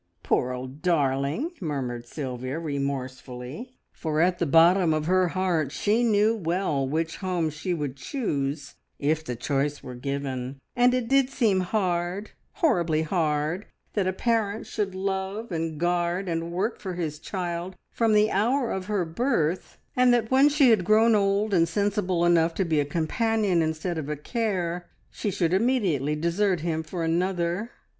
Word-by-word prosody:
"Poor 125 - +1
old 130 +3 -7
darling!" 150 - +1
murmured 125 -7 -3
Sylvia 130 0 -4
remorsefully, 140 - -5
for 155 -2 -2
at 180 +1 +2
the 170 - +1
bottom 165 +2 +5
of 155 0 -1
her 185 +1 +3
heart 175 -5 0
she 215 +9 +1
knew 215 0 +3
well 170 -7 -1
which 160 +2 -1
home 180 -5 -1
she 160 +5 -4
would 145 -6 -2
choose 140 - -3 0.2
if 155 +2 0
the 125 -5 -4
choice 140 +4 -1
were 125 - -7
given, 135 0 -4 0.2
and 245 +1 +4
it 250 -2 -1
did 270 0 +3
seem 225 -8 +2
hard 185 0 -1 0.2
horribly 170 - +2
hard 160 +2 -1 0.3
that 200 -3 0
a - - +2
parent 220 +1 0
should 200 -3 -3
love 195 +3 -3
and 160 -2 -3
guard 175 +2 0
and 165 0 -2
work 200 +7 -1
for 185 -3 -5
his 155 -4 -3
child 175 +1 -4 0.2
from 225 -2 +2
the 210 0 +4
hour 235 +5 +1
of 190 -1 -3
her 205 -4 0
birth, 175 - -1 0.2
and 250 0 +5
that 235 -1 +1
when 270 +3 +6
she 285 -4 +5
had 210 -5 +3
grown 220 +4 +5
old 200 0 +2
and 165 -2 +3
sensible 200 -3 0
enough 170 -1 +3
to 190 - 0
be 160 -3 +1
a 145 - +1
companion 190 - +1
instead 160 +2 -2
of 150 -1 -5
a 150 - -1
care, 180 - -2 0.2
she 210 - -3
should 175 -3 0
immediately 190 - +1
desert 170 +3 +1
him 160 -1 -1
for 165 +2 -5
another! 175 +4 0
175 Hz, 165 wpm, -26 LUFS, 155-205 Hz, 0.3 s, when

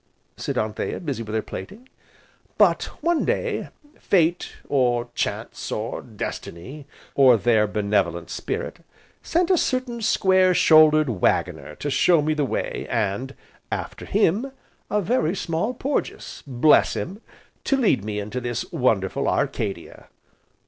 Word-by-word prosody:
said - - -4
Anthea, 110 0 -2
busy 140 -8 -4
with 110 -1 -5
her 110 - 0
plaiting. 225 +7 -9 0.7
"But, - - +4 0.2
one 340 -1 +2
day, - - -1 0.3
Fate, 175 -2 +1
or 120 -3 +1
Chance, - - -4
or - - -3
Destiny, 135 - -7 0.3
or 130 -4 +6
their 110 -1 +3
benevolent 100 -5 -1
spirit, - - -4 0.4
sent 350 +2 +1
a 360 - +4
certain 255 -2 -1
square 185 -3 +3
shouldered 155 -2 +6
Waggoner - - 0
to 145 - -4
show 155 +3 +4
me 155 +1 +1
the 150 -2 0
way, - - -3
and, 115 +4 -2 0.4
after - - -5
him, 210 +6 +1 0.4
a 210 -1 0
very 200 -4 +1
small 170 +5 -1
Porges, 275 +4 -3
bless 135 +3 +4
him! 195 +5 -5 0.4
to 275 - +2
lead 205 - +2
me 105 -1 -4
into 105 +5 -4
this 120 -2 -3
wonderful - - 0
Arcadia." - - -2
150 Hz, 130 wpm, -23 LUFS, 120-200 Hz, 0.7 s, or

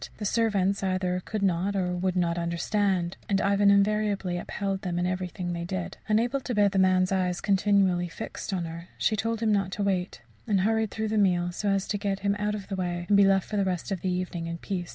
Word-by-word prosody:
The 210 - -5
servants 200 -3 +1
either 185 -1 0
could 215 -2 -3
not 190 +1 +1
or 180 -2 0
would 185 +1 -1
not 170 -1 +1
understand, 175 +1 0
and 195 -1 +2
Ivan 200 0 +3
invariably 200 -2 +2
upheld 195 +1 -3
them 180 -4 -3
in 175 - 0
everything 180 -1 -3
they 170 0 -4
did. 180 +1 -4
Unable 235 +5 +2
to 250 -2 -4
bear 205 -1 +4
the 195 - 0
man's 185 0 +3
eyes 180 -2 0
continually 195 -3 +2
fixed 170 - -6
on 180 -3 -1
her, 165 +1 -8
she 215 - +1
told 225 +2 -2
him 220 -1 +2
not 195 -2 +1
to 205 - -2
wait, 185 -9 -1 0.2
and 200 -3 +2
hurried 220 +2 +1
through 220 +1 -3
the 215 0 +1
meal 175 -3 +2
so 205 +3 -2
as 195 -1 0
to 205 - -2
get 200 -1 -2
him 200 0 +1
out 210 0 0
of 200 -2 -7
the 195 - -3
way, 175 -2 -2
and 205 - +5
be 200 0 +6
left 195 -1 +3
for 210 - -3
the 200 - +2
rest 185 0 -2
of 190 - -2
the 185 - -1
evening 180 -2 -3
in 170 0 -4
peace. 175 0 -4
195 Hz, 235 wpm, -27 LUFS, 180-205 Hz, 0.2 s, be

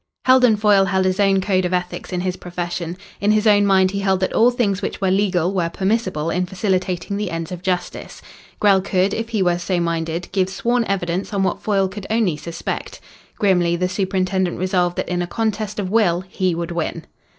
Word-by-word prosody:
Heldon 255 -4 +5
Foyle 205 -2 +4
held 190 0 +1
his 185 +1 0
own 195 -1 +3
code 185 -1 +1
of 180 0 0
ethics 180 +1 -4
in 180 -1 -2
his 185 0 -2
profession. 175 -1 -5 0.2
In 205 +1 +2
his 215 +1 +1
own 205 -1 +5
mind 190 -1 +4
he 200 - -2
held 190 -1 +1
that 185 - 0
all 235 +2 +5
things 210 -6 0
which - - -4
were 190 -1 +1
legal 190 -2 +1
were 175 -3 0
permissible 185 -4 -1
in 180 +1 -1
facilitating 190 0 -1
the 205 -2 -2
ends 165 +1 -5
of 180 -1 -6
justice. 180 -1 -3 0.4
Grell 195 -2 +4
could, 190 +1 +1
if 225 0 -3
he 215 -4 0
were 175 -1 +1
so 180 0 -1
minded, 165 0 -2
give 190 -2 +1
sworn 235 +5 0
evidence 185 0 -2
on 195 - +1
what 190 - -1
Foyle 195 -3 +1
could 195 +1 -8
only 220 -7 +1
suspect. 165 +3 -5 0.4
Grimly 180 -4 +2
the 180 +1 0
superintendent 185 -1 -1
resolved 180 -1 0
that - - -2
in 180 0 -1
a 175 - -2
contest 215 +1 -2
of 195 -3 -3
will 180 -6 +3
he 185 -1 -2
would 170 0 -4
win. 170 -2 -3
190 Hz, 205 wpm, -20 LUFS, 180-200 Hz, 0.4 s, Heldon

